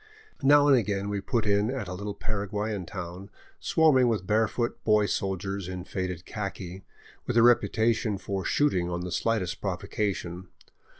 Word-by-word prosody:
Now 145 +1 +6
and 140 - +7
again 100 -4 0
we 100 -1 -2
put 115 +1 -1
in 100 +1 +2
at 130 -6 -3
a 90 - -5
little 100 +2 -5
Para 105 -2 -3
guayan 105 -2 -3
town, 95 0 -7 0.3
swarming 145 -6 +4
with 110 -5 0
barefoot 110 +3 0
boy 105 -1 +4
soldiers 95 -1 -2
in 90 -1 -5
faded 90 -2 -4
khaki, 95 -3 -6 0.4
with 120 - 0
a 115 - +7
reputation 115 -3 +3
for 95 0 -4
shooting 95 -13 +1
on 85 0 -3
the 90 0 -5
slightest 110 -5 -1
provocation. 95 -2 -3
100 Hz, 160 wpm, -27 LUFS, 95-115 Hz, 0.4 s, and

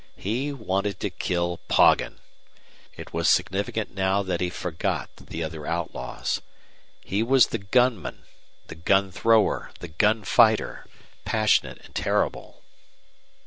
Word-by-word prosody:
He 125 +9 -2
wanted 100 -6 -2
to 100 - -2
kill 85 -1 -2
Poggin. - - +4 0.8
It - - -10
was - - +1
significant 100 +3 0
now 95 +1 +1
that 90 -2 -2
he 90 - 0
forgot 85 -2 -3
the 80 - -6
other 80 -1 -6
outlaws. 85 -7 -3 0.6
He 100 +3 -1
was 130 +1 +5
the - - -4
gunman, 120 +1 0 0.4
the - - -9
gun 95 +4 +1
thrower, 110 +2 +2
the 85 - -8
gun 105 +7 +2
fighter, 110 +1 +3 0.4
passionate 110 -1 +1
and - - -18
terrible. - - -2
100 Hz, 125 wpm, -25 LUFS, 90-110 Hz, 0.8 s, was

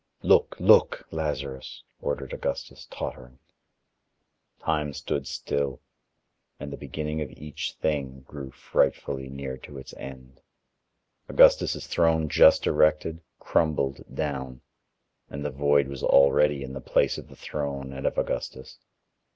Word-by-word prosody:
"Look, - - +4
look, - - +5
Lazarus," 70 -4 -4 0.2
ordered 70 -2 -3
Augustus - - -4
tottering. 65 0 -7 1.2
Time 75 -2 -1
stood 70 0 -3
still, 70 -2 -2 0.8
and 70 - -6
the - - -3
beginning 75 +1 -4
of 75 - -3
each 75 +3 -6
thing 70 -4 -2
grew 70 0 -9
frightfully 65 +1 -1
near 70 -1 -5
to 70 +2 -11
its 65 - -10
end. 65 -1 -10 0.9
Augustus' - - +5
throne 80 -2 +2
just - - +6
erected, 80 +1 +2 0.2
crumbled 70 -4 0
down, 65 -4 -4 0.7
and 70 +1 -6
the 75 - -1
void 70 0 +3
was 70 -1 -7
already 70 0 +4
in 65 0 -7
the 70 - -6
place - - +1
of - - -11
the - - -14
throne 70 -2 -4
and 65 0 -2
of - - -2
Augustus. 65 - -3
70 Hz, 125 wpm, -26 LUFS, 65-75 Hz, 1.2 s, just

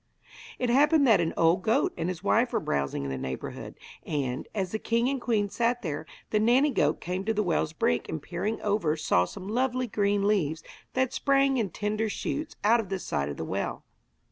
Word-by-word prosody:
It 250 -2 0
happened 295 +3 +5
that 225 -5 +5
an 165 -1 0
old 165 +2 +4
goat 225 +8 +2
and 170 +1 -2
his 180 0 -5
wife 235 +4 +2
were - - +2
browsing 70 -1 -2
in 70 - -3
the 65 - -3
neighbourhood, 65 0 -6 0.3
and, 135 -4 -3
as 190 -3 -1
the 220 - -2
king 235 +2 +1
and 270 -1 -1
queen 215 -4 +1
sat 240 +4 0
there, 155 -2 -4 0.2
the 215 - +3
nanny 250 +7 +4
goat 150 - +1
came 180 +2 -3
to 225 0 0
the 210 - +1
well's 165 -4 0
brink 85 - 0
and 160 - -3
peering 180 +8 -3
over 200 -7 +1
saw 90 - +2
some 185 - -9
lovely 255 +3 0
green 205 -2 +1
leaves 165 -6 +1 0.3
that 260 0 +1
sprang 275 -1 +2
in 220 -5 0
tender 210 +4 -2
shoots 305 +8 -4
out 230 +3 +5
of 210 -5 -4
the 195 - -1
side 70 - -2
of 70 - -6
the - - -4
well. - - -3
205 Hz, 210 wpm, -28 LUFS, 165-240 Hz, 0.3 s, happened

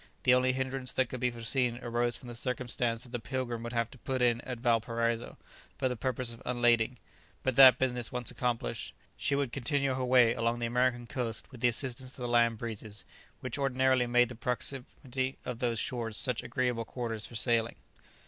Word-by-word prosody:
The 125 - +6
only 130 0 +4
hindrance 130 0 -2
that 130 -2 +1
could 130 - -5
be 125 0 +2
foreseen 120 +1 0
arose 120 0 0
from 125 - -13
the 120 - -6
circumstance 120 -1 -2
that 125 - -11
the 120 - -2
"Pilgrim" 120 -1 -3
would 120 0 -5
have 115 -1 0
to 130 - -14
put 130 +1 -2
in 120 -1 +3
at 125 -2 -5
Valparaiso 115 0 0 0.4
for 130 - +1
the 125 - -2
purpose 125 +1 -2
of 115 - -13
unlading; 120 -1 +2 0.5
but 130 -2 0
that 130 -2 +9
business 125 -3 -1
once 125 -1 -1
accomplished, 120 - -2 0.2
she 140 - 0
would 140 -4 -1
continue 140 +1 0
her 130 0 -2
way 125 -2 +5
along 115 +1 0
the 120 - -2
American 120 0 +1
coast 115 -1 -3
with 125 -3 -12
the 125 - +5
assistance 130 +1 0
of - - -14
the - - -1
land 120 -1 +3
breezes, 110 -2 -5 0.4
which 130 +2 -4
ordinarily 130 -2 +2
make 120 0 +4
the - - -6
proximity 130 +2 -3
of 125 -2 -4
those 120 -2 0
shores 115 -2 -2
such 125 -5 +1
agreeable 125 -1 -1
quarters 115 -3 -4
for 120 - -12
sailing. 115 0 +1
125 Hz, 195 wpm, -31 LUFS, 115-130 Hz, 0.5 s, that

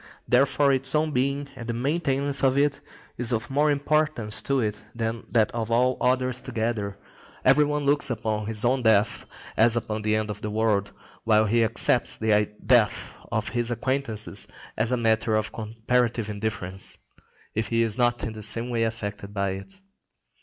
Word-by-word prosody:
Therefore 140 +2 +3
its 135 +2 +1
own 155 0 +2
being, 140 +2 0
and 115 -2 -8
the 120 - -2
maintenance 140 +1 0
of 135 0 +3
it, 145 0 +1 0.4
is 120 0 +3
of 115 +4 -2
more 145 +2 +3
importance 145 -6 0
to 140 -1 0
it 105 -3 -2
than 115 0 -3
that 110 -2 +2
of 115 -2 -3
all 125 +2 +3
others 130 0 +1
together. 110 -5 -2 0.5
Every 150 - +6
one 150 0 -1
looks 145 0 +3
upon 110 -3 -2
his 110 0 +1
own 130 +2 +2
death 110 -2 +2 0.3
as 115 +1 +4
upon 110 -2 -2
the 110 0 +1
end 110 -1 -1
of 105 +1 -8
the 105 - -3
world, 105 -2 +1 0.3
while 110 -1 +4
he 115 +2 +3
accepts 115 +2 +1
the 105 -1 +2 0.2
death 120 -5 +3 0.2
of - - -1
his 120 0 -1
acquaintances 120 -2 -2 0.3
as 110 +3 0
a 125 - +2
matter 110 -1 +2
of 110 0 -1
comparative 115 0 -1
indifference, 100 -3 -4 0.6
if 110 0 -1
he 115 0 +2
is 110 -2 -1
not 120 -1 +2
in 110 -1 -5
some 115 +4 0
way 115 -1 0
affected 105 -2 -5
by 100 -1 0
it. 95 - -7
115 Hz, 175 wpm, -25 LUFS, 110-130 Hz, 0.6 s, Every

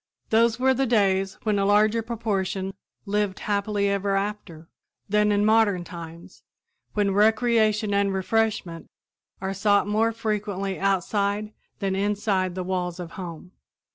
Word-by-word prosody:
Those 225 +1 +3
were 265 +1 +4
the 265 +1 0
days 195 -4 +1
when 210 -2 +1
a 195 - +1
larger 215 +2 +3
proportion 200 -4 -2 0.3
"lived 205 -1 -1
happy 205 0 0
ever 200 0 0
after" 195 -5 -4 0.4
than 210 +1 +2
in 205 0 +2
modern 215 -4 +3
times, 170 -1 -10 0.5
when 205 -2 +2
recreation 215 0 +3
and 200 0 +2
refreshment 190 -3 -1 0.5
are 190 0 -2
sought 200 +1 +2
more 220 +2 +2
frequently 205 -4 -3
outside 200 +2 0 0.2
than 195 -2 -1
inside 195 -2 0
the 185 - -3
walls 180 -1 -3
of 170 -2 -7
home. 180 -2 -8
200 Hz, 135 wpm, -25 LUFS, 190-215 Hz, 0.5 s, were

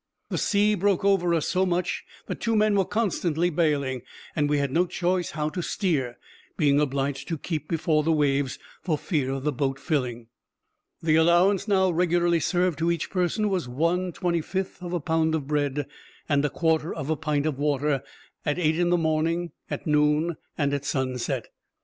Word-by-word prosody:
The - - -2
sea 210 0 +3
broke 200 -1 +1
over 190 -3 +3
us 160 - 0
so 185 - +2
much, 180 -1 -1 0.2
that - - -5
two 230 -1 +1
men 215 -1 +3
were 195 -2 +3
constantly 175 -5 0
bailing; 145 -6 0 0.3
and 145 -2 +1
we 150 - +2
had 140 -2 0
no 175 +5 +2
choice 175 +1 0
how 150 0 0
to 180 - -4
steer, 150 - -1 0.4
being 145 -3 +3
obliged 135 0 -1
to 165 - -2
keep 155 -1 -4
before 160 -2 +1
the 160 +2 +1
waves, 140 -3 +1 0.2
for 160 -4 0
fear 145 -5 -1
of 135 0 -3
the 150 - +1
boat 135 -1 -1
filling. 125 -7 -2 0.8
The 160 -1 +4
allowance 175 +5 +4
now 190 -3 +3
regularly 175 0 +2
served 175 -1 +1
to 165 +1 +1
each 170 -2 -1
person 185 +4 +1
was 185 -9 -1
1 170 +7 0
25th 180 +2 -2
of 175 - -5
a 175 - 0
pound 160 0 +1
of 150 -4 -3
bread, 145 -1 0 0.4
and 145 -1 +2
a 150 - +1
quarter 160 0 +1
of 145 - -3
a - - +2
pint 150 -1 -1
of 150 -3 -1
water, 145 -1 +1 0.4
at 150 - 0
eight 160 -1 +1
in 175 0 +2
the 175 - +4
morning, 165 +1 0 0.2
at - - -4
noon, 150 +2 +2 0.2
and 145 -2 +1
at 140 -1 -1
sunset. 130 -3 -2
160 Hz, 185 wpm, -26 LUFS, 145-175 Hz, 0.8 s, The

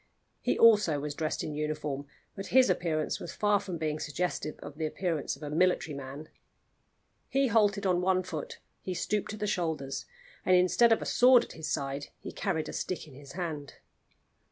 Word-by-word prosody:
He - - 0
also 210 -10 +6
was 145 +1 -4
dressed 155 +1 -2
in 155 - -4
uniform, 150 -2 -3 0.3
but 195 - -6
his 260 +1 +5
appearance 155 -3 -1
was 170 - -7
far 210 -1 +3
from 185 -4 -5
being 155 -1 -2
suggestive 155 0 -2
of 145 - -10
the 160 - 0
appearance 165 -2 -2
of - - -13
a 145 - -4
military 165 -2 +2
man. 140 +3 -7 1.0
He 275 +1 +2
halted 210 -3 +3
on 180 -2 +2
one 185 0 +2
foot, 470 - -6 0.2
he 185 - -4
stooped 210 +4 -1
at - - -11
the 210 - -1
shoulders, 160 -9 -2 0.4
and 185 - +4
instead 185 +6 +5
of 225 - +3
a - - -6
sword 250 -1 +6
at - - -11
his 160 -2 -6
side 140 0 -2
he - - -8
carried 160 -1 -2
a - - -6
stick 180 -3 -3
in 145 - -14
his 140 +1 -12
hand. 160 -6 -5
165 Hz, 190 wpm, -30 LUFS, 150-200 Hz, 1.0 s, also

